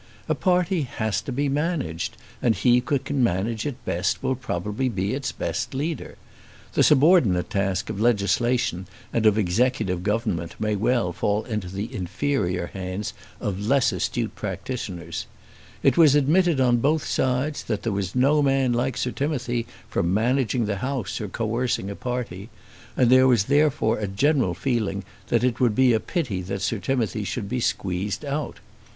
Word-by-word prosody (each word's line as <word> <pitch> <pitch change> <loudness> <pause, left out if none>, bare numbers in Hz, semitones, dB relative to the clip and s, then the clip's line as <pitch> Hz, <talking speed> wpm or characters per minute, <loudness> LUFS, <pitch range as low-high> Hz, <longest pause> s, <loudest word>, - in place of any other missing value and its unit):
A - - +2
party 180 -2 +1
has 110 -6 -2
to - - -6
be 140 +3 0
managed, 140 - -2 0.2
and 115 -3 +3
he 125 -1 +4
who 140 - +2
can 135 0 -1
manage 110 +3 0
it 140 - -7
best, 90 +9 -1
will 130 0 +1
probably 110 0 -2
be 100 -1 -1
its 135 0 -2
best 120 +3 -3
leader. 155 +4 -3 0.6
The - - +2
subordinate 140 - +4
task 95 -1 0
of 105 -1 -4
legislation 120 -3 +1 0.3
and 110 -2 +3
of 105 0 +4
executive 105 -1 +1
government 100 -5 -1
may 105 -1 0
well 110 -3 +1
fall 105 +4 0
into 105 -6 -4
the 100 +7 -5
inferior 90 -2 -1
hands 95 +2 -4 0.3
of 100 -2 -3
less 135 0 +3
astute - - -2
practitioners. 90 -10 -5 0.6
It - - +4
was 155 -4 +7
admitted 155 +2 +3
on 125 -2 +4
both 145 +5 +1
sides 130 +3 0
that 105 -3 -2
there 115 - -1
was 100 0 -3
no 140 +4 +4
man 135 -3 +2
like 125 +1 0
Sir 125 - -1
Timothy 125 -5 -2 0.2
for - - -1
managing 115 +6 +1
the 105 -1 -2
House 130 +2 -3
or 105 - -3
coercing 115 -1 -1
a - - -6
party, 120 -5 -4 0.5
and 125 -2 +4
there 130 0 +7
was 120 -6 +4
therefore 145 -3 +2
a 105 - -2
general 120 - +1
feeling 110 -4 -1 0.2
that 115 0 +1
it 125 -2 +1
would 120 -4 +3
be 130 -2 +5
a 110 - +3
pity 120 - -2
that 95 +1 -4
Sir 110 +1 0
Timothy 110 -4 -1
should 100 +1 -3
be 125 +4 -2
squeezed 100 +3 -2
out. 145 +1 -3
120 Hz, 170 wpm, -24 LUFS, 100-135 Hz, 0.6 s, was